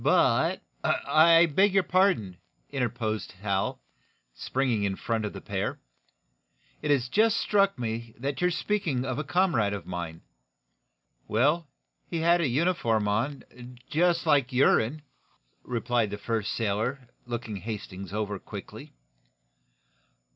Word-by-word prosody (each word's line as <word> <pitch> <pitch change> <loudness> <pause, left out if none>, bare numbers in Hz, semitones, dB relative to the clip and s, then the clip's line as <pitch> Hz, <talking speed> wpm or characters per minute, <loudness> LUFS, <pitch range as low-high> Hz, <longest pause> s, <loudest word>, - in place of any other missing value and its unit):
"But - - +3
" - - -40
"I 165 +2 +5
beg 190 +5 +2
your 195 - +5
pardon," 180 - +2 0.3
interposed 120 -5 -2
Hal, 95 0 -2 0.5
springing 125 - -1
in 100 -1 0
front 115 +1 -2
of 105 - -4
the - - -8
pair. - - -3 1.0
"It 150 - -3
has 135 -4 +2
just 220 - +3
struck 200 -3 +2
me 115 -1 -4
that 140 +5 -3
you 180 - +4
are - - +2
speaking 170 -9 -1
of 130 0 -2
a - - -1
comrade 150 - +1
of 100 -4 -5
mine." 85 -2 -5 1.1
"Well, 150 +9 +2 0.4
he - - -3
had 170 +1 +4
a 160 - +2
uniform 120 - +1
on, 115 +8 -1 0.5
just 170 +1 +2
like 140 -2 +3
your'n, 130 +2 +3 0.6
replied 120 -2 0
the 105 - -5
first 110 0 -2
sailor, 115 +5 -2 0.2
looking 120 -3 -4
Hal 95 - -11
Hastings 100 -4 -6
over 105 -1 -3
quickly. - - -10
125 Hz, 135 wpm, -27 LUFS, 105-160 Hz, 1.1 s, I